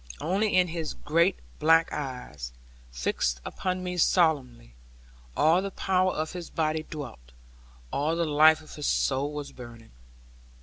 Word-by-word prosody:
Only 200 +5 0
in 180 -1 +4
his 160 -2 -4
great 170 +5 +2 0.2
black 165 +1 +4
eyes, 125 - -6 0.4
fixed - - -1
upon 185 0 -3
me 180 0 -3
solemnly, 140 - +1 0.6
all 165 +4 +4
the 195 - -3
power 185 -1 +1
of 155 -1 -3
his 180 -2 -7
body 155 -1 0
dwelt, 120 - -8 0.6
all 155 +3 0
the 170 0 0
life 155 +1 +5
of 155 - -13
his 150 - -3
soul 140 +2 +1
was 150 -1 -6
burning. 120 -2 -12
155 Hz, 140 wpm, -27 LUFS, 135-175 Hz, 0.6 s, life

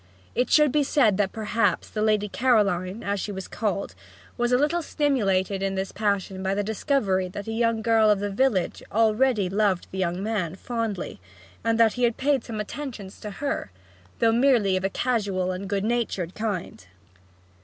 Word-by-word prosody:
It 250 - 0
should 300 -3 +5
be 300 - +3
said 255 -8 +3
that 205 -2 +1
perhaps 215 -1 0
the 215 - -4
Lady 215 -1 +2
Caroline 205 -4 +1
(as 200 0 -1
she 205 - -3
was 190 -1 -6
called) 200 -3 -2 0.4
was 240 0 0
a 250 - +5
little 300 +6 +1
stimulated 200 - 0
in 195 0 -1
this 190 0 -3
passion 200 -2 -1
by 190 +1 0
the 205 - 0
discovery 205 -3 0
that 200 +2 -7
a 225 - -4
young 230 -1 0
girl 225 -1 +4
of 205 -2 +3
the 205 0 -2
village 210 -3 +1
already 220 -1 +2
loved 195 -1 +1
the 190 - -5
young 180 +1 -1
man 205 -6 -2
fondly, 225 -2 -4 0.4
and 230 0 +1
that 225 -2 +5
he 250 - -2
had 235 -1 +2
paid 275 -2 +1
some 220 -3 -6
attentions 210 -4 -6
to 210 - -6
her, 275 - -3 0.5
though 230 -1 +3
merely 230 -5 +3
of 185 - -1
a 195 - +1
casual 200 -6 -1
and 190 +1 -5
good 200 -1 0
natured 220 -7 -1
kind. 185 - -4
210 Hz, 185 wpm, -25 LUFS, 195-235 Hz, 0.5 s, should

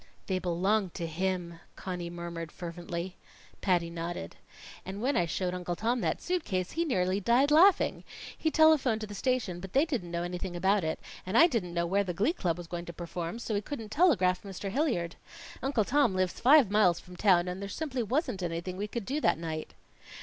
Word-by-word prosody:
"They 185 -1 -1
belong 185 +3 +1
to 170 - -3
him," 170 0 -2 0.2
Conny 180 -2 -5
murmured 170 -2 -6
fervently. 175 +1 -6 0.4
Patty 175 -3 +1
nodded. 170 - -5 0.5
"And 190 +2 -6
when 265 +6 0
I 175 - +2
showed 180 +3 -2
Uncle 180 -1 -3
Tom 235 +6 0
that 160 -3 -1
suit 360 -2 0
case, 185 -2 -2
he 335 +1 0
nearly 185 - +1
died 245 +8 +3
laughing. 350 +5 +5 0.3
He 320 - 0
telephoned 305 -8 +4
to - - -3
the 205 - -9
station, 215 -5 -1
but 190 +1 -9
they 280 +4 +4
didn't 250 - -3
know 170 0 -2
anything 180 +1 -4
about 190 +2 +2
it, 160 0 -2 0.2
and 190 +5 0
I 330 - +9
didn't 205 - -1
know 170 0 +1
where 195 +4 +2
the 180 -3 -4
glee 215 - +2
club 175 - -1
was 175 - -7
going 170 +1 -5
to 170 - -7
perform, 170 +2 -5
so 235 -1 -4
we 205 - +1
couldn't 225 -2 -6
telegraph 210 - +3
Mr. 195 0 -6
Hilliard. 215 - 0 0.4
Uncle 260 -6 +1
Tom 265 -6 +3
lives 185 -1 0
five 265 -4 +6
miles 195 -5 +4
from 180 - -13
town, 180 -2 +4
and 180 +2 -4
there 200 - -5
simply 270 -1 -3
wasn't 235 - -1
anything 175 +1 -3
we 205 +2 -2
could 225 -1 -5
do 285 +6 -2
that - - +3
night." 160 -1 -5
190 Hz, 205 wpm, -30 LUFS, 175-235 Hz, 0.5 s, I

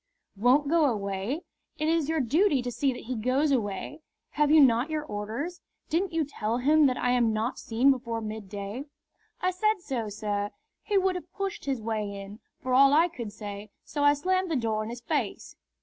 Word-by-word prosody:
"Won't 250 +8 +3
go 325 +1 +4
away? 210 - -2 0.3
It 305 - -1
is 325 -2 +1
your 320 0 +1
duty 285 - +2
to 245 - -3
see 275 +2 +1
that 245 - -7
he 255 +2 -4
goes 255 +6 +1
away. 235 +5 -2 0.3
Have 295 -1 +2
you 310 +1 +7
not 255 0 +5
your 310 -1 -2
orders? 250 +9 -5 0.3
Didn't 355 +4 0
you 325 -2 0
tell 230 -5 -2
him 295 +4 +5
that 255 - 0
I 245 - +1
am 240 -3 +3
not 220 +3 -2
seen 245 +5 +3
before 235 -3 -2
midday?" 215 +2 -6 0.6
"I 365 - +2
said 425 +3 +1
so, 255 -10 -3
sir. 205 -1 -2 0.3
He 415 -2 0
would 380 -1 +2
have 360 -1 -7
pushed 395 +1 -4
his 265 -5 -2
way 210 -3 -3
in, 200 +2 -9 0.2
for 255 - -1
all 275 +2 +7
I 335 +3 +5
could 235 -10 -6
say, 205 -1 -8
so 290 -1 -3
I 290 0 +6
slammed 370 +4 0
the 320 - 0
door 225 -4 0
in 215 - -6
his 240 +1 -7
face." - - -3
255 Hz, 200 wpm, -28 LUFS, 220-310 Hz, 0.6 s, you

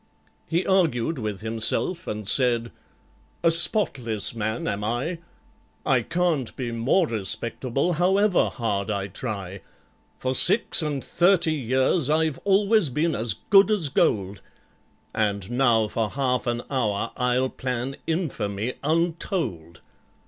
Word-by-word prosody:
He 170 +3 0
argued 165 -7 +1
with 105 -3 -4
himself, 115 +11 -2
and 105 -2 -5
said, 120 -1 +1 0.7
"A 165 - +5
spotless 140 - +2
man 110 0 -3
am 100 +1 -2
I; 125 +11 -2 0.7
I 135 -4 +3
can't 165 -2 -1
be 125 -3 -4
more 120 +11 +2
respectable, 115 - -2
however 190 +3 +2
hard 105 -5 -3
I 100 -2 -2
try! 100 -3 -6 0.6
For 130 0 -2
six 180 - +5
and 145 -4 -3
thirty 175 -2 +2
years 130 +3 0
I've 155 -2 +1
always 200 -2 +3
been 155 +5 0
as 110 -2 -1 0.2
good 195 -1 +7
as 195 -9 0
gold, 100 -6 0 0.7
And 100 -1 -1
now 120 -4 +2
for 110 0 -2
half 130 -2 -1
an 120 0 -1
hour 115 -4 -1
I'll 125 +1 0
plan 130 +1 -4
infamy 125 - -2
untold! 160 - -2
130 Hz, 125 wpm, -24 LUFS, 110-165 Hz, 0.7 s, good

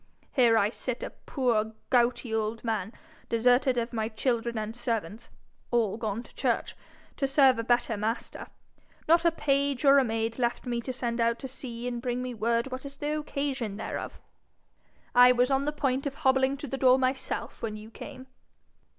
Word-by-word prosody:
Here 235 -4 +4
I 205 0 +3
sit, 250 0 -4
a - - -5
poor 225 -5 -1 0.2
gouty 240 -1 +2
old 220 0 -1
man, 220 -3 -2 0.4
deserted 245 +2 +3
of 235 +1 -2
my 220 -1 -1
children 235 0 -1
and 215 +1 -4
servants 225 -3 -3 0.4
all 230 -5 +1
gone 220 0 -3
to - - -19
church - - -1 0.4
to 275 - +1
serve 270 -3 +5
a - - -1
better 240 -1 +1
Master 220 +4 -3 0.6
not 335 +1 +4
a 335 - +5
page 280 -3 0
or 280 0 +8
a - - +3
maid 225 0 -2
left 240 +1 -1
me 240 -1 -2
to 255 - -4
send 240 -2 -2
out 230 0 +2
to 265 - -6
see 245 -2 -6
and 240 -1 -3
bring 250 0 -2
me 250 -1 -4
word 235 +3 0
what 255 0 -5
is 280 0 -9
the 295 +1 -2
occasion 275 -8 -3
thereof! 220 - -5 0.9
I 250 0 +8
was 250 +2 +2
on 270 +1 +2
the 295 - 0
point 275 -2 -1
of 275 - -5
hobbling 265 -2 +2
to 290 - -6
the 270 +1 -4
door 255 -1 +6
myself 260 0 -2
when 215 -2 -3
you 215 +1 -11
came.' 260 +1 -9
245 Hz, 185 wpm, -28 LUFS, 230-270 Hz, 0.9 s, or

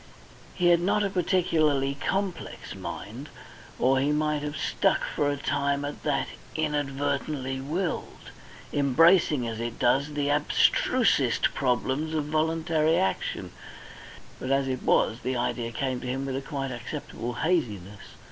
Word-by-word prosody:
He 175 -1 +3
had 170 -1 +6
not 200 +4 +1
a 200 - -1
particularly 155 -7 +2
complex 190 +5 -3
mind, 105 - -7 0.5
or 130 +2 +3
he 140 +2 +1
might 150 0 +1
have 150 +1 -4
stuck - - +1
for 145 - +2
a 145 - -1
time 140 0 0
at 145 - -6
that 145 -2 0 0.3
"inadvertently 145 -2 -1
willed," 165 +6 -4 0.4
embracing, 145 -1 +4
as 115 -1 -4
it 115 0 -4
does, 140 +4 +2
the 145 -1 +1
abstrusest 150 - +3
problems 135 +4 0
of 150 -2 0
voluntary 160 +1 +1
action; 190 +1 -1 0.9
but 130 - -5
as 135 0 +2
it 130 -1 -2
was, 115 - +2
the 130 +1 -2
idea 120 -1 -2
came 130 +1 -2
to 125 - -6
him 135 +2 -2
with 135 -1 -3
a 135 - -2
quite 135 -2 -4
acceptable 120 -1 -5
haziness. 105 - -1
145 Hz, 140 wpm, -27 LUFS, 130-155 Hz, 0.9 s, had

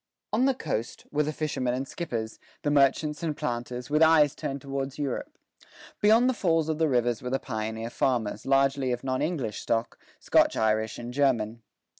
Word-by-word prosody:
On 245 +4 +3
the 270 -1 +3
coast, 120 - -4
were 150 - +1
the 150 +1 -1
fishermen 135 -5 -1
and 135 +1 -3
skippers, 115 -11 -4 0.2
the 145 - +1
merchants 145 +1 +2
and 155 -3 -2
planters, 120 +1 -4
with 150 +1 +3
eyes 155 -3 +6
turned 140 +1 -4
toward 135 0 -4
Europe. 275 - -4 0.6
Beyond 225 +4 +5
the 260 - +3
falls 165 -7 +1
of 155 0 -1
the 160 -1 +3
rivers 120 -3 +1
were 125 - -4
the 135 - +1
pioneer 110 -2 -4
farmers, 110 -5 -1
largely 135 -1 +2
of 120 0 -3
non 130 -1 -1
English 135 - -2
stock, 115 0 -1 0.2
Scotch - - +3
Irish 110 0 +1
and 120 +1 -7
German. 120 -5 +1
135 Hz, 180 wpm, -27 LUFS, 120-150 Hz, 0.6 s, eyes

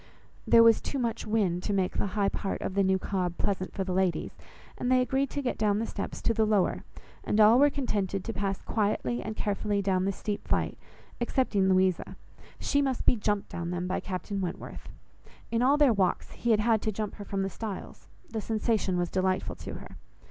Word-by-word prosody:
There 230 - +7
was 230 -1 +6
too 280 - -4
much 235 -3 -2
wind 200 -5 +1
to 205 - -2
make 190 -2 0
the - - +1
high 200 -1 +3
part 195 - -3
of - - -3
the 200 - +2
new 190 0 +3
Cobb 180 -2 -2
pleasant 185 -2 -1
for 195 - -2
the 185 -1 -3
ladies, 185 -1 0 0.4
and 250 - -1
they 255 - +5
agreed 265 +2 +1
to 285 - -3
get 245 - -2
down 210 -2 +2
the 225 - -1
steps 200 - -5
to 230 - +2
the 220 0 +2
lower, 210 -3 +1 0.4
and 210 - 0
all 220 +3 +7
were 290 +1 +6
contented 200 -9 -2
to 225 - -4
pass 195 -1 -2
quietly 200 - 0
and 215 - -5
carefully 205 0 -1
down 190 -2 +1
the 195 - +1
steep 205 +1 -4
flight, - - 0 0.5
excepting 230 -6 +1
Louisa; 185 -1 +2 0.4
she 285 - +1
must 265 -3 -1
be - - +5
jumped 210 -2 -1
down 170 0 -4
them 180 0 -2
by 185 - -1
Captain 195 +1 -4
Wentworth. 180 -2 -6 0.6
In 230 0 +1
all 270 +4 +4
their 290 -5 +5
walks, 190 -3 0
he 240 - -3
had 215 -2 +4
had 225 -1 +2
to 215 - -1
jump 210 0 -4
her 205 - -7
from 195 -1 -2
the 195 - -1
stiles; 210 +1 -7 0.2
the 225 -1 -4
sensation 215 -4 0
was 175 -1 -1
delightful 185 0 0
to - - -7
her. - - -10
205 Hz, 215 wpm, -28 LUFS, 190-225 Hz, 0.6 s, There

